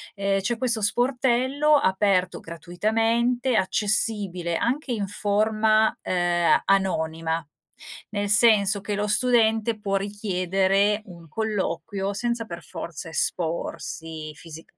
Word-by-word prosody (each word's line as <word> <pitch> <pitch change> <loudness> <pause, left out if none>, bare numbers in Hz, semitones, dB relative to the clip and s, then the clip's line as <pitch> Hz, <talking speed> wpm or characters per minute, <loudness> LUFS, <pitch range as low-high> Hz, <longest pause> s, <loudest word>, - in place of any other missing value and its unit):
Ehm, 195 0 0
c'è 230 +4 -1
questo 235 -3 +2
sportello 260 +6 +2
aperto 190 -4 +1
gratuitamente, 225 - 0
accessibile 195 -4 0
anche 260 +2 -1
in 205 -4 -2
forma, 215 +2 +1
ehm, 175 -1 +2
anonima, 165 -4 0 0.7
nel 205 -1 -2
senso 210 -1 +4
che 205 - -4
lo 210 +1 -1
studente 225 -1 +2
può 195 -1 -2
richiedere 195 0 0
un 170 -3 -13
colloquio, 200 0 -3
senza 235 +2 -2
per 170 -4 -8
forza 165 0 -7
esporsi 160 -1 -3
fisicame 165 +1 -13
200 Hz, 105 wpm, -24 LUFS, 175-225 Hz, 0.7 s, senso